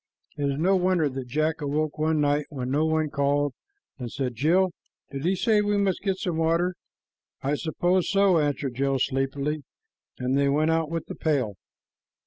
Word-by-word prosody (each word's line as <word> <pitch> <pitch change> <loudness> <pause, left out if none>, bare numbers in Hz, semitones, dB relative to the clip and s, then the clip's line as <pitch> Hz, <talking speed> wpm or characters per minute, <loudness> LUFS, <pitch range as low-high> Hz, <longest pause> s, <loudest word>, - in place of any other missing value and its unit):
It 145 - -2
is 140 - -2
no 185 +5 +3
wonder 180 -4 +2
that 130 -1 -6
Jack 155 +4 0
awoke 150 +1 -1
one 155 0 +2
night 145 0 +1
when 130 -4 -4
no 150 +3 +2
one 155 -1 0
called 145 0 +1 0.5
and 120 -2 -5
said, 130 -3 -2
"Jill, 175 - +2 0.4
did 140 +2 -5
he 185 +2 +2
say 215 +2 +3
we 205 0 +1
must 195 -2 +1
get 195 -2 0
some 180 -3 -2
water?" 165 +3 +2 0.7
"I 140 +2 +1
suppose 175 +4 0
so," 195 -4 +4
answered 145 -3 -1
Jill 135 +2 0
sleepily, 140 +3 -1 0.6
and 125 +1 0
they 140 0 +3
went 155 +3 +2
out 160 -1 +1
with 165 0 -3
the - - -7
pail. 135 -9 0
155 Hz, 180 wpm, -26 LUFS, 140-170 Hz, 0.7 s, so